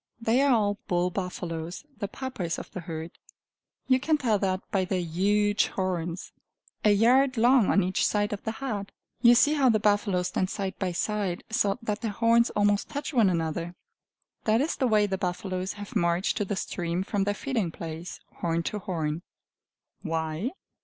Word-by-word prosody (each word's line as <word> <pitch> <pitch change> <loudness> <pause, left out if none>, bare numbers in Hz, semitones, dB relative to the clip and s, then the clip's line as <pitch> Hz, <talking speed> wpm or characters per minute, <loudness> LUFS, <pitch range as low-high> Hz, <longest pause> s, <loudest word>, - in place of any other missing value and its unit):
They 230 +3 +2
are 280 - +4
all 205 -4 +2
bull 180 0 +1
buffaloes, 175 - -4
the 200 - -2
Papas 205 -8 -4
of - - -8
the - - -5
herd; 165 -1 -6 0.8
you 255 -1 +4
can 310 +3 +2
tell 225 -7 +1
that 185 -1 0
by 190 -2 +2
their 185 0 -1
huge 205 +5 +2
horns, 180 -2 -3 0.5
a 215 - +5
yard 250 +5 +4
long 240 -1 +5
on 200 - +4
each 185 +1 +1
side 205 +1 0
of 200 - -5
the 220 - -2
head. 220 -6 -4 0.3
You 240 -1 +7
see 290 +5 +5
how 275 -4 +4
the 220 -2 +3
buffaloes 205 -3 +1
stand 185 - -1
side 195 -2 -3
by 185 -2 -1
side, 195 0 -2
so 205 -2 +1
that 215 -1 -2
their 230 - -1
horns 230 +2 +4
almost 205 0 +2
touch 290 +2 -4
one 225 -6 +5
another. 170 0 -2 0.7
That 220 +1 +3
is 295 +5 0
the 260 - +1
way 215 -2 +4
the 190 -2 -2
buffaloes 185 0 -2
have 205 0 -9
marched 170 +2 +1
to 205 - 0
the 205 - -2
stream 175 -1 -2
from 200 -1 -1
their 205 0 0
feeding 230 -10 -1
place 165 +1 -7 0.2
horn 165 -1 -1
to 210 - -3
horn. 165 -4 -2 0.8
Why? 160 +4 -2
200 Hz, 180 wpm, -27 LUFS, 180-225 Hz, 0.8 s, You